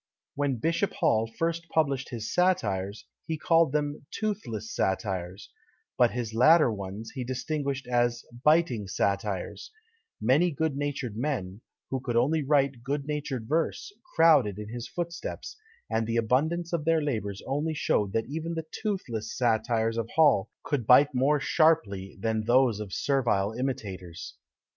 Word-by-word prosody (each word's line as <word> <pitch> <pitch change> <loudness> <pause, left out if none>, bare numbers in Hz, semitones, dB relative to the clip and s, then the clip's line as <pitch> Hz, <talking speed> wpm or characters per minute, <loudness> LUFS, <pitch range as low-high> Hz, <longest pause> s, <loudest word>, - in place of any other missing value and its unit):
When 140 -2 0
Bishop 165 - 0
Hall 110 0 +2
first 170 0 -1
published 140 -5 0
his 115 -3 -5
satires, 105 - 0 0.2
he 160 - -2
called 165 -1 +3
them 145 -1 -2
"Toothless 155 - -4
Satires," 95 -1 -2 0.4
but 120 -1 +4
his 115 -2 -4
latter 150 +3 +6
ones 100 +2 -7
he 130 - -4
distinguished 135 +2 -3
as 120 -1 0 0.2
"Biting 150 - +3
Satires;" 100 0 -2 0.5
many 135 +11 +3
good 160 -1 -1
natured 140 -6 -3
men, 110 -6 -3 0.3
who 135 - 0
could 125 -2 -3
only 145 +7 +2
write 140 -3 +1
good 140 +3 -3
natured 145 -6 -3
verse, 165 - -1 0.2
crowded 145 - +5
in 105 0 -7
his 120 +1 -6
footsteps, 170 +2 -5 0.3
and 115 0 -1
the 115 0 0
abundance 155 +10 +1
of 165 -3 0
their 160 -1 +2
labours 105 -8 -3
only 150 +4 -1
showed 105 -8 +1
that 115 - 0
even 160 +5 -4
the 160 -1 -4
"toothless" 120 - -4
satires 115 -1 +1
of 115 0 -2
Hall 145 -11 +4
could 130 -7 -2
bite 140 +3 +6
more 140 +4 +2
sharply 135 - +1
than 110 +1 -1
those 120 -2 +3
of 105 -3 -6
servile 115 -6 +1
imitators. 95 -9 -5
130 Hz, 145 wpm, -28 LUFS, 110-155 Hz, 0.5 s, latter